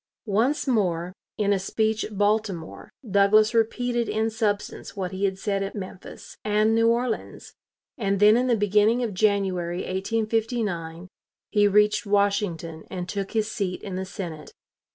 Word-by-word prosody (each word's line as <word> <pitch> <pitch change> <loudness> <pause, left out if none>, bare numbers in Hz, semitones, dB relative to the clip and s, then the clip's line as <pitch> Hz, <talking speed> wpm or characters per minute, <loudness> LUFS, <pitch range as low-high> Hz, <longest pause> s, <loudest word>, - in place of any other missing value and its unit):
Once 235 +9 +1
more, 180 -7 0 0.2
in 205 -1 +2
a 195 - +1
speech 220 +3 0
at 210 - -7
Baltimore, 205 -5 -1 0.2
Douglas 210 +2 +4
repeated 235 0 0
in 220 +1 0
substance 215 -2 -2
what 185 -3 -3
he 190 +1 -1
had 190 -1 -1
said 200 0 -1
at 195 - -4
Memphis 185 -2 -9
and 215 +1 +2
New 230 0 +3
Orleans, 235 0 -2 0.5
and 200 -3 0
then 210 +1 +7
in 250 +2 +2
the 240 - +3
beginning 210 +4 +3
of 225 -4 -2
January, 185 -3 0
1859, 205 -4 -2 0.4
he 205 -1 +4
reached 210 +1 +3
Washington 200 -5 0
and 180 -1 -5
took 195 +2 -4
his 220 -1 0
seat 195 -5 -3
in 195 - -6
the 185 +1 -2
Senate. 175 -4 -7
205 Hz, 155 wpm, -25 LUFS, 190-220 Hz, 0.5 s, then